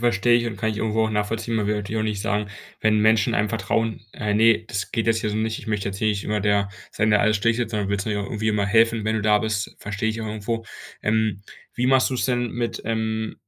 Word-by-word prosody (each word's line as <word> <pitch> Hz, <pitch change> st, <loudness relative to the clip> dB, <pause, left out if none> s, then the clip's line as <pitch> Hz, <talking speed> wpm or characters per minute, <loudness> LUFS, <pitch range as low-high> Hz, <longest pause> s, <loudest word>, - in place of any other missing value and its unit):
verstehe 120 Hz, 0 st, +3 dB
ich 120 Hz, -, -2 dB
und 115 Hz, -, -4 dB
kann 110 Hz, -1 st, -1 dB
ich 105 Hz, -, -4 dB
irgendwo 110 Hz, +1 st, +1 dB
auch 110 Hz, -, -1 dB
nachvollziehen, 110 Hz, +2 st, -2 dB
man 105 Hz, -2 st, 0 dB
will 105 Hz, -, +1 dB
natürlich 105 Hz, +2 st, -3 dB
auch -, -, 0 dB
nicht 105 Hz, -2 st, -2 dB
sagen, 105 Hz, -1 st, -1 dB, 0.3 s
wenn 110 Hz, 0 st, +3 dB
Menschen 110 Hz, 0 st, +3 dB
einem 105 Hz, +1 st, +1 dB
vertrauen, 115 Hz, -1 st, -1 dB
äh: 105 Hz, -1 st, -2 dB
„Ne, 115 Hz, +1 st, +5 dB
das 100 Hz, -2 st, -4 dB
geht 115 Hz, 0 st, -1 dB
jetzt 115 Hz, 0 st, +2 dB
hier 105 Hz, -, -1 dB
so 105 Hz, -, -2 dB
nicht. 110 Hz, 0 st, -1 dB
Ich -, -, -11 dB
möchte 105 Hz, -2 st, -1 dB
jetzt 95 Hz, 0 st, -5 dB
hier 110 Hz, -, +1 dB
nicht 100 Hz, -2 st, -1 dB
immer 105 Hz, -1 st, -1 dB
der 100 Hz, -1 st, +2 dB, 0.2 s
sein, 110 Hz, 0 st, +1 dB
der 105 Hz, -, +5 dB
alles 110 Hz, 0 st, +3 dB
schlichtet“. 115 Hz, +2 st, 0 dB
Sondern 105 Hz, -3 st, -1 dB
willst 100 Hz, 0 st, -1 dB
natürlich 105 Hz, -2 st, -1 dB
auch -, -, -8 dB
irgendwie 110 Hz, 0 st, -1 dB
immer 105 Hz, -2 st, +1 dB
helfen, 115 Hz, +1 st, +3 dB
wenn 110 Hz, 0 st, +1 dB
du 105 Hz, -, -2 dB
da 105 Hz, 0 st, +4 dB
bist, 105 Hz, -1 st, -2 dB
versteh 105 Hz, +1 st, -3 dB
ich 110 Hz, +1 st, -3 dB
auch 110 Hz, -, -4 dB
irgendwo, 110 Hz, +2 st, -3 dB, 0.4 s
ähm. 110 Hz, -2 st, +1 dB, 0.4 s
Wie 125 Hz, +1 st, +1 dB
machst 130 Hz, -1 st, +4 dB
du's 130 Hz, -2 st, -1 dB
denn 120 Hz, -2 st, 0 dB
mit, 120 Hz, -1 st, -3 dB
ähm 110 Hz, 0 st, -2 dB
110 Hz, 265 wpm, -23 LUFS, 105-115 Hz, 0.4 s, Ne